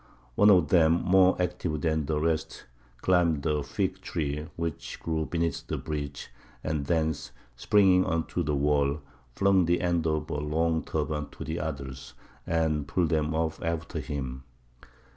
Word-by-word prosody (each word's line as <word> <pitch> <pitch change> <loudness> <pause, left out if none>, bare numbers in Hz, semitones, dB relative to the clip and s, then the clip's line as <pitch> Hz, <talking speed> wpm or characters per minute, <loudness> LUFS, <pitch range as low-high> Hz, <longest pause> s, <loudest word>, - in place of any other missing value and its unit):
One 105 +10 +5
of 90 -7 +5
them, 80 -3 +5
more 95 +2 +4
active 90 -4 -2
than 80 -3 0
the 75 -1 0
rest, 80 0 -2 0.4
climbed 85 -6 +2
a 75 -2 +1
fig 95 +5 -2
tree 75 -3 -3
which 85 -2 -4
grew 80 -1 -2
beneath 85 -1 -2
the - - -2
breach, 70 -2 -5 0.3
and 75 -3 -2
thence, 80 -6 0 0.2
springing 95 +7 +4
on 80 0 0
to 90 - -1
the 75 -3 0
wall, 70 +1 +1 0.3
flung 95 -2 +4
the 85 +1 +2
end 85 -2 +1
of 75 -1 -1
a 75 - -1
long 80 +2 0
turban 75 -1 -2
to - - -7
the 80 +2 -3
others, 70 -5 -6 0.3
and 80 -3 0
pulled 85 +1 +1
them 80 0 0
up 80 0 -1
after 85 0 -3
him. 65 -3 -5
80 Hz, 160 wpm, -28 LUFS, 75-85 Hz, 0.4 s, One